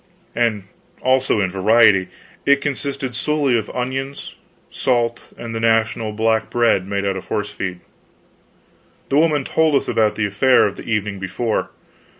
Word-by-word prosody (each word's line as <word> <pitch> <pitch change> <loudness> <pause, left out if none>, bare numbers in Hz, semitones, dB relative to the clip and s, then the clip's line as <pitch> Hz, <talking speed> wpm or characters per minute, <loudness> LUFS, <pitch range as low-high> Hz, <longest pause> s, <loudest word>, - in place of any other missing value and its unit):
And 115 -4 0 0.4
also 130 -4 +2
in 95 -2 -1
variety; 95 0 +4 0.4
it 140 0 +4
consisted 140 -2 -3
solely 145 -1 +1
of 110 - -2
onions, 135 +2 -4 0.4
salt, 120 -2 -1
and 115 -1 -7
the 115 - -3
national 115 -1 +1
black 110 +1 0
bread 115 -6 +2
made 100 0 -2
out 95 -1 -1
of 95 - -8
horse 105 -1 -3
feed. 90 -3 -5 1.3
The 140 - +2
woman 155 -3 +2
told 160 +1 +1
us - - +1
about 110 -2 +1
the 110 - 0
affair 105 +6 +3
of 100 - -2
the - - -9
evening 105 -2 -1
before. 95 +4 -2
115 Hz, 155 wpm, -20 LUFS, 105-130 Hz, 1.3 s, variety